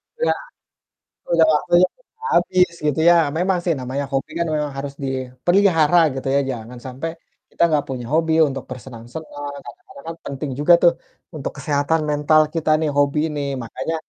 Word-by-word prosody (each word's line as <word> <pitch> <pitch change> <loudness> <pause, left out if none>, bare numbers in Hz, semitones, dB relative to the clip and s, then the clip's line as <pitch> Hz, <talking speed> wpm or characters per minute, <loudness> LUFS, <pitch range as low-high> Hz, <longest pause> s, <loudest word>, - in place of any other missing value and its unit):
Iya, 480 +1 +1 1.0
udah 165 -1 +5
waktunya 175 +4 +4
udah 460 -2 -13
habis 180 -1 +3
gitu 150 0 +1
ya. 175 - +7 0.2
Memang 185 +1 +1
sih 170 - +1
namanya 130 +3 -3
hobi 135 +3 -1
kan 170 - 0
memang 150 -1 -1
harus 140 0 -5
dipelihara 155 +6 +2 0.2
gitu 135 0 -4
ya, 140 - +4
jangan 120 0 -7
sampai 130 +6 -5 0.4
kita - - -3
nggak 150 -2 +1
punya 125 -3 -5
hobi 160 0 +2
untuk 135 -1 -6
bersenang-senang, 130 +4 -8
kadang-kadang 370 -6 -13
kan 165 - -5
penting 140 +1 -4
juga 150 +4 +4
tuh 175 -1 +6 0.4
untuk 145 - -4
kesehatan 145 +2 0
mental 150 +1 +3
kita 160 -1 0
nih, 160 - 0
hobi 145 +1 +2
ini, 150 -2 -4 0.2
makanya 130 +6 -4
150 Hz, 160 wpm, -21 LUFS, 135-170 Hz, 1.0 s, ya